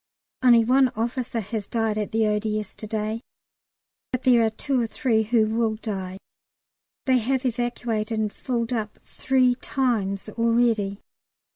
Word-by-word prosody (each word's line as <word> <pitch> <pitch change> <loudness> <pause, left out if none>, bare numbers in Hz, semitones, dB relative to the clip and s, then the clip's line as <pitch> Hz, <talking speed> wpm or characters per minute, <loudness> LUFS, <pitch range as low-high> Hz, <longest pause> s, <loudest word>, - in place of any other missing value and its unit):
Only 240 -3 +6
one 260 +2 +5
officer 235 +1 -2
has 210 0 -5
died 225 -2 0
at 210 -1 -2
the 220 0 +2
O.D.S. 210 -1 -1
to 215 - -8
day, 215 +1 -2 0.9
but 255 -1 -2
there 245 -3 +5
are 220 - +3
two 255 +4 -1
or 230 - 0
three 225 -2 +1
who 220 0 +2
will 220 0 0
die. 190 -4 -5 0.9
They 260 -1 +4
have 260 +3 -1
evacuated, 235 -2 -1
and 215 -1 -1
filled 240 -1 -2
up 215 -3 -3
three 255 -2 +2
times 225 -7 -1
already. 230 -3 +1
225 Hz, 145 wpm, -24 LUFS, 215-245 Hz, 0.9 s, Only